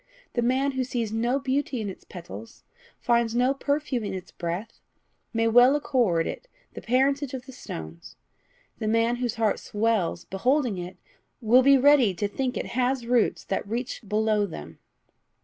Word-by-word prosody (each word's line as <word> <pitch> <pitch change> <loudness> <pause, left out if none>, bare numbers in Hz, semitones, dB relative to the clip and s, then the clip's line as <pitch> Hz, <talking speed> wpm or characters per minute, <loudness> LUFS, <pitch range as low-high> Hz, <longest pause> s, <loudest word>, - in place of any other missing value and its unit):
The 240 - 0
man 260 +4 +1
who 260 -1 -1
sees 240 -4 -3
no 240 +4 +1
beauty 270 -1 -1
in 215 - -3
its 190 - -8
petals, 185 +5 -10 0.3
finds 235 -1 +1
no 250 +2 +3
perfume 285 -3 -1
in 205 - -3
its 185 - -8
breath, 175 +6 -5 0.5
may 225 -1 +1
well 245 +4 +6
accord 235 - +1
it - - -6 0.3
the - - -8
parentage 270 +2 +1
of 255 0 -7
the 265 - -10
stones; 80 - -9 0.6
the 215 - -2
man 230 +2 +2
whose 245 -2 -2
heart 220 -3 +1
swells 215 -4 -1
beholding 245 +1 0
it 180 +1 -7 0.4
will 245 +1 +5
be 275 +1 +6
ready 265 -7 +5
to 205 +4 -1
think 255 +5 -2
it - - -3
has 250 0 0
roots 240 -1 +1
that 195 - -3
reach 235 +4 -4
below 210 -1 +1
them." 75 - -9
235 Hz, 165 wpm, -26 LUFS, 210-260 Hz, 0.6 s, well